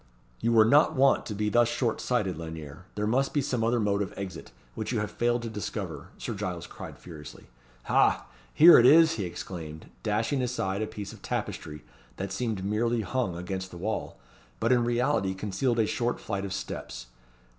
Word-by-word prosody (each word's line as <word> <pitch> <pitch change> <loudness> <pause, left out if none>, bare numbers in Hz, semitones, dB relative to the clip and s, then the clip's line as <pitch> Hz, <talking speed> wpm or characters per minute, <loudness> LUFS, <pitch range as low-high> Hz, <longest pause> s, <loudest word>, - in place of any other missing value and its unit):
"You 115 - +1
were 110 -2 +6
not 145 +7 +5
wont 135 0 +3
to 105 - -4
be 105 +1 0
thus 120 +2 +4
short 120 -1 -1
sighted, 105 -7 0
Lanyere. 80 0 -8
There 105 - -1
must 130 +7 +1
be 145 - +3
some 125 -4 -1
other 120 +1 +2
mode 105 -1 +1
of 100 - -4
exit, 100 -2 -7 0.2
which 110 - -4
you 120 - 0
have 105 - -3
failed 120 0 0
to - - -3
discover," 105 -2 -5
Sir - - -4
Giles 85 -2 -4
cried - - -9
furiously. 75 -4 -11 0.4
"Ha! - - +3 0.3
here 170 +3 +9
it 120 - +6
is!" 160 +3 +7
he 100 - -2
exclaimed, 80 -3 -7
dashing 110 +6 0
aside 110 -6 -1
a 110 - -1
piece 100 -2 -7
of - - -14
tapestry 75 -1 -4 0.3
that - - -4
seemed 110 -6 -2
merely 115 +3 +1
hung 105 -3 -2
against 95 +1 -4
the 90 - -10
wall, 110 +6 -3 0.4
but 115 - +1
in 120 -2 +4
reality 120 -5 +1
concealed 105 +5 -1
a 110 - +3
short 120 +3 -1
flight 100 0 -3
of 100 - -5
steps. 75 -10 -6
105 Hz, 190 wpm, -28 LUFS, 95-120 Hz, 0.4 s, here